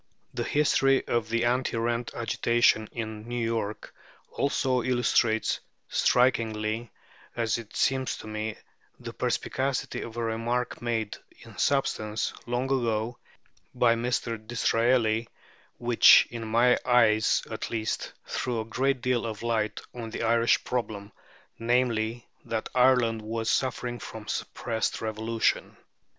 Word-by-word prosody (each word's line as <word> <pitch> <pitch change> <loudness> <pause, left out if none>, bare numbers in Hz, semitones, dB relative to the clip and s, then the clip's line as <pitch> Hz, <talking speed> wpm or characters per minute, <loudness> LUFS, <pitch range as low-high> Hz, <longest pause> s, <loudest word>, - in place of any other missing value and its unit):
The - - -3
history 135 -2 +2
of 115 -2 0
the 115 +1 +1
anti 125 0 +1
rent 115 +1 -1
agitation 115 -1 +2
in 110 -1 -6
New 120 -1 -1
York 110 -2 -3 0.4
also 130 -2 +1
illustrates 120 -3 +1 0.3
strikingly, 115 -2 +1 0.4
as 115 -1 0
it 115 -3 -11
seems 130 -1 +1
to - - -10
me, 110 0 -4 0.4
the - - -7
perspicacity 135 0 -2
of 115 0 -8
a 120 - -1
remark 115 +2 -2
made, 115 -3 -2 0.2
in - - -13
substance, 110 -6 0
long 120 +1 0
ago 120 -3 -1 0.6
by 120 -2 +4
Mr. 115 -1 -2
Disraeli, 115 0 +1 0.5
which, 120 -1 +7
in 115 -1 -5
my 120 +3 +4
eyes 110 -3 +4
at - - -4
least, 110 -1 -2
threw 125 -3 -2
a 110 - -3
great 130 +3 0
deal 125 -1 +1
of 110 0 -6
light 110 -2 -1
on 115 -2 -6
the 110 - -4
Irish 115 +1 +3
problem, 105 -4 -3 0.5
namely, 120 -1 0 0.2
that 110 -1 -3
Ireland 125 -3 +3
was 110 +1 -2
suffering 125 -2 -1
from 110 -1 -9
suppressed 110 -2 -2
revolution. 110 +1 -1
115 Hz, 125 wpm, -27 LUFS, 110-125 Hz, 0.6 s, which